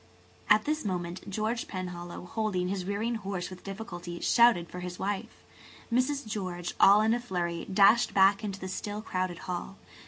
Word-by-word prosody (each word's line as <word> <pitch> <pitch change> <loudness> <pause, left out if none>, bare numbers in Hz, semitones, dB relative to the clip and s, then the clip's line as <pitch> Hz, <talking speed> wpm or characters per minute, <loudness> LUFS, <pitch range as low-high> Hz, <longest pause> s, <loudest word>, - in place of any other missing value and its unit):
At 210 0 +5
this 305 +1 -1
moment 180 -1 -4
George 220 +4 -2
Penhallow, 180 -2 -6
holding 185 -3 -1
his 190 -2 -2
rearing 205 +4 -1
horse 190 -2 -4
with 185 - -10
difficulty, 180 -4 -7
shouted 235 -8 +4
for 180 - -8
his 180 0 -6
wife. 200 0 -4 0.5
Mrs. 260 +3 +1
George, 185 -5 -4
all 200 +2 +7
in 220 +1 +3
a 240 - +1
flurry, 175 -7 -3
dashed 205 +4 +5
back 195 +2 +4
into 200 -2 -4
the 190 - -5
still 205 +3 -4
crowded 185 -4 -2
hall. 180 +2 -5
195 Hz, 165 wpm, -29 LUFS, 180-215 Hz, 0.5 s, all